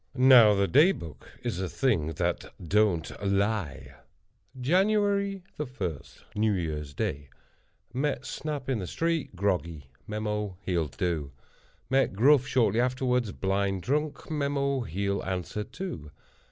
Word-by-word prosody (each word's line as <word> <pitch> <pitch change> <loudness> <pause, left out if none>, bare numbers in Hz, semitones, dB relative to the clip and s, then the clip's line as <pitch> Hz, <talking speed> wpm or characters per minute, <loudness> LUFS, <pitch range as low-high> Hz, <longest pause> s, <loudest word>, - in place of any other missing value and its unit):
Now, 125 -5 +7
the 100 0 +2
Day 155 - +6
Book 80 - -10
is 90 - -2
a 95 - -2
thing 105 - +1
that - - -2
don't 95 -1 +1
lie. 100 -4 -1 0.7
"Jan. 180 +10 +3
1.—New 175 - -2
Year's 75 -5 -3
Day. 70 0 -3 0.6
Met 135 -1 -1
Snap 150 -4 -4
in 130 -4 0
the 90 - -4
street, 165 - -1
groggy. 85 -8 -2 0.2
Mem—he'll 105 -5 -2
do. 75 -1 -3 0.6
Met 135 -5 +3
Gruff 135 +6 +5
shortly 115 -2 +2
afterward, 125 -3 0
blind 95 -1 0
drunk. 150 +2 -2
Mem—he'll 140 - -1
answer, 95 +2 -3
too. 105 - -7
105 Hz, 115 wpm, -28 LUFS, 90-135 Hz, 0.7 s, Now